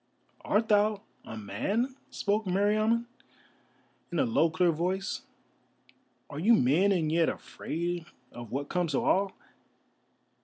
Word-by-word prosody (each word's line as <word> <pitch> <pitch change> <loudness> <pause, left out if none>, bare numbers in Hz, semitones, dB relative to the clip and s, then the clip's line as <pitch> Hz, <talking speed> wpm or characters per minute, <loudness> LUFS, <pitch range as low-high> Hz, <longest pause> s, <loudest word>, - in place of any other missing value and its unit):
"Art 220 +2 +1
thou 210 0 +3 0.2
a 110 - -8
man?" 200 - -2
spoke 210 +1 -1
Meriamun, 215 +5 +2 1.1
in - - -2
a 270 - +3
low 230 -9 +3
clear 170 +2 +2
voice; 185 +4 -2 1.1
"are 145 - -7
you 225 +8 +5
men, 165 - +3
and 165 -5 +1
yet 165 0 +3
afraid 170 0 -4 0.2
of 120 -2 -9
what 140 +2 -2
comes 175 -3 -1
to - - +2
all? 195 0 +2
185 Hz, 125 wpm, -29 LUFS, 160-210 Hz, 1.1 s, you